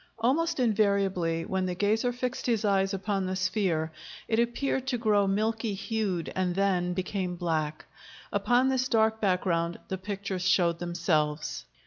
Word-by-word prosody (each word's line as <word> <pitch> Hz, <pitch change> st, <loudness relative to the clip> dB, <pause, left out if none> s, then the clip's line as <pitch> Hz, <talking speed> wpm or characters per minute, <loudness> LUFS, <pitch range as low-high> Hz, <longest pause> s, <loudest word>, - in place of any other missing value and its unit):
Almost 280 Hz, +8 st, +1 dB
invariably, 195 Hz, -7 st, +1 dB
when 190 Hz, -1 st, -1 dB
the 180 Hz, -, -2 dB
gazer 215 Hz, +6 st, +1 dB
fixed 250 Hz, +1 st, -3 dB
his 225 Hz, -3 st, +1 dB
eyes 195 Hz, -1 st, +2 dB
upon 195 Hz, -1 st, -1 dB
the 185 Hz, -, -2 dB
sphere, 185 Hz, -4 st, 0 dB, 0.4 s
it 225 Hz, -, +1 dB
appeared 255 Hz, +2 st, 0 dB
to 255 Hz, -2 st, 0 dB
grow 210 Hz, -3 st, +2 dB
milky 220 Hz, +2 st, 0 dB
hued 195 Hz, -4 st, -2 dB
and 180 Hz, -2 st, 0 dB
then 185 Hz, -2 st, +1 dB
became 185 Hz, -1 st, -2 dB
black; 155 Hz, -3 st, -2 dB, 0.5 s
upon 250 Hz, +2 st, +3 dB
this 255 Hz, -1 st, +1 dB
dark 220 Hz, -1 st, +2 dB
background 175 Hz, -3 st, +1 dB
the 190 Hz, -, -3 dB
pictures 195 Hz, -1 st, -4 dB
showed 170 Hz, -2 st, +3 dB
themselves. 160 Hz, -4 st, -1 dB
195 Hz, 145 wpm, -28 LUFS, 180-220 Hz, 0.5 s, upon